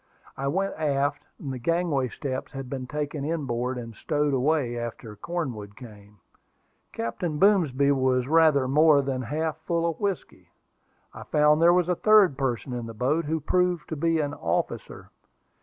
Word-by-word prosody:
I 135 - -3
went 195 +7 0
aft. 145 -1 -1
The 135 -4 -5
gangway 165 -2 0
steps 130 +2 -5
had 135 -2 -7
been 130 -2 -4
taken 150 0 -4
in 155 0 -2
board, 125 +1 -2
and 115 -2 -7
stowed 145 +5 -1
away 135 -2 +1
after 120 -2 -6
Cornwood 110 - -5
came. 105 -4 -14 0.7
Captain 150 +8 -3
Boomsby 150 -8 +3
was 130 -2 +1
rather 155 -4 +4
more 150 +1 +5
than 130 -1 -2
half 155 +6 -2
full 165 +1 -1
of 165 -2 -3
whiskey. 200 -3 -4 0.6
I - - -10
found 150 +1 +3
there 170 +1 +7
was 175 -1 +2
a 180 - +2
third 205 -4 +5
person 130 -1 -2
in 120 -2 -4
the 115 - -9
boat, 140 +8 0
who 160 +2 -1
proved 180 +2 0
to 160 - -3
be 165 +2 +1
an 145 -1 -1
officer. - - -3
145 Hz, 165 wpm, -26 LUFS, 130-160 Hz, 0.7 s, there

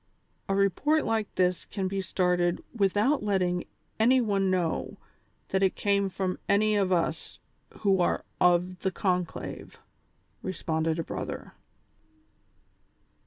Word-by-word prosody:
A 195 - +2
report 260 - +2
like 220 -2 -1
this 180 -1 +1
can 195 -2 -3
be 195 +1 -2
started 180 -1 +1
with 200 -4 +1
out 270 +8 +3
letting 185 -4 0 0.3
any 250 +4 +5
one 200 -5 +1
know 180 -3 -1 0.5
that 190 - +1
it 190 -1 +2
came 200 -1 +1
from 185 -1 -3
any 215 +1 +3
of 195 -2 +1
us 165 -2 -1 0.4
who 195 -3 +3
are - - 0
of 180 +1 +3
the 190 - 0
conclave," 180 -1 -3 0.6
responded 160 -3 -1
a 165 - -1
brother. - - -6
190 Hz, 125 wpm, -28 LUFS, 180-205 Hz, 0.6 s, any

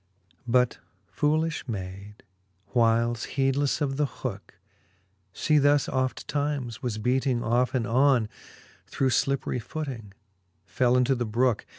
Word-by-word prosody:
XLIII. 95 +2 -39
But 125 0 +2 0.4
foolilh 155 0 0
mayd, 100 0 -7 0.5
whiles, 115 0 +2
heedlefle 135 +2 +1
of 135 -2 -1
the 150 -1 +2
hooke, - - -7 0.8
She 150 +8 +2
thus 145 0 +3
oft 130 0 -2
times 140 -6 -2
was 120 -4 -2
beating 125 +2 0
off 120 +3 +1
and 120 -3 0
on, 125 -1 +3 0.6
Through 135 - 0
llipperie 135 -1 0
footing, 120 -6 -6 0.5
fell 125 +4 +2
into 125 +1 +3
the 120 -2 -2
brooke. 120 +1 +1
125 Hz, 125 wpm, -26 LUFS, 115-140 Hz, 0.8 s, thus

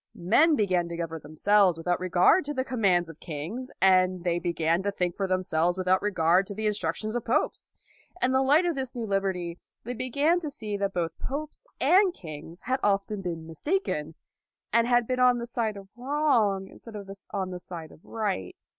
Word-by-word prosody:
Men 295 - +4
began 185 -6 +1
to 170 - -5
govern 165 -2 -4
themselves 180 +4 +3
without 175 +2 -1
regard 185 - +4
to 295 0 -4
the 260 - 0
com 255 -3 -5
mands 175 -4 +3
of 165 -1 -12
kings, 180 - -6
and 185 -1 +4
they 175 -1 +1
began 170 0 0
to 200 +1 -1
think 180 -3 -1
for 195 - -1
themselves 180 -2 +1
without 185 0 +2
regard 185 -2 +2
to 200 - -7
the 220 +1 -3
in 210 - +2
structions 210 +4 -3
of 240 - -1
popes. 230 - -1 0.5
In 255 - +2
the 260 0 +3
light 290 +6 +4
of 345 - +1
this 265 -2 -4
new 235 -2 -3
liberty, 190 -4 -2 0.2
they 245 - -4
began 280 +8 +1
to 315 -4 -4
see 220 -8 -5
that 200 -1 -2
both 165 -2 -2
popes 305 - -6
and 375 0 +4
kings 160 +1 -9
had 260 +1 -1
often 200 0 0
been 170 -3 -5
mistaken, 165 - -2 0.6
and 230 +1 +4
had 245 -1 +3
been 255 +2 -2
on 250 -1 +5
the 235 - -4
side 225 -3 -2
of 195 -1 -10
wrong 240 -8 +1
in - - -15
stead 230 -2 -11
of 200 -2 -7 0.2
on 190 -2 -3
the 180 - -5
side 170 -3 -8
of - - -18
right. 205 - -3
195 Hz, 205 wpm, -27 LUFS, 175-245 Hz, 0.6 s, on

